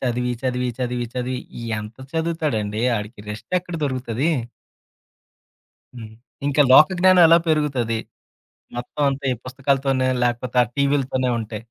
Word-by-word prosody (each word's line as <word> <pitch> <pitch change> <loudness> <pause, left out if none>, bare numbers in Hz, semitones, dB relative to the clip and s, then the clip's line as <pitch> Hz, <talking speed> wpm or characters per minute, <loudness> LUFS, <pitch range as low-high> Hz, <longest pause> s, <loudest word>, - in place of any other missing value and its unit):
చదివి 125 -1 -1
చదివి 125 -1 -1
చదివి 125 -1 -2
చదివి 125 0 -2 0.4
ఎంత 105 +1 -8 0.2
చదువుతాడండి 150 -11 -1 0.2
ఆడికి 105 +1 -7
రెస్ట్ 110 +6 -8
ఎక్కడ 175 -1 -9
దొరుకుతది? 130 +1 -1 1.7
హ్మ్. 110 -2 -9 0.3
ఇంకా 145 +1 +3
లోక‌జ్ఞానం 185 +4 +6
ఎలా 165 +1 +7
పెరుగుతది? 135 -7 +1 0.8
మొత్తం 120 +4 -5
అంతా 135 +1 -5
ఈ - - -5
పుస్తకాలతోనే 135 0 0 0.2
లేపోతే 125 +1 -1
ఆ - - -3
టీవీలతోనే 140 -2 +1
ఉంటే. 110 -1 -5
130 Hz, 120 wpm, -22 LUFS, 120-145 Hz, 1.7 s, ఎలా